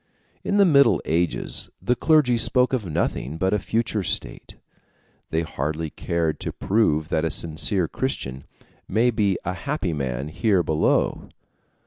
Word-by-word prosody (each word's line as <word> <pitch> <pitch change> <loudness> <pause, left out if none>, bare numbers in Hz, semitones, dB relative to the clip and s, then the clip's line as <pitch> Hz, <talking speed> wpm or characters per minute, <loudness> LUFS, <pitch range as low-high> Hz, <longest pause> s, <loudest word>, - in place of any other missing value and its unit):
In 200 - 0
the 200 - +6
Middle 140 -5 +5
Ages 85 +2 -1
the 125 - +1
clergy 150 -4 +3
spoke 125 +3 +2
of 115 -7 -1
nothing 75 -2 -2
but 95 +4 +1
a 105 - +2
future 110 +1 -1
state; 80 -5 -3 0.7
they 80 +1 0
hardly 80 +1 -3
cared 85 -2 -2
to - - -3
prove 80 -7 +1
that 80 - 0
a 80 - +1
sincere 80 +3 0
Christian 70 - -4 0.4
may 115 +5 +2
be 105 -4 +1
a 90 - -1
happy 100 - -3
man 70 -1 -3
here 95 +2 +1
below. 80 -1 0
90 Hz, 145 wpm, -23 LUFS, 80-115 Hz, 0.7 s, the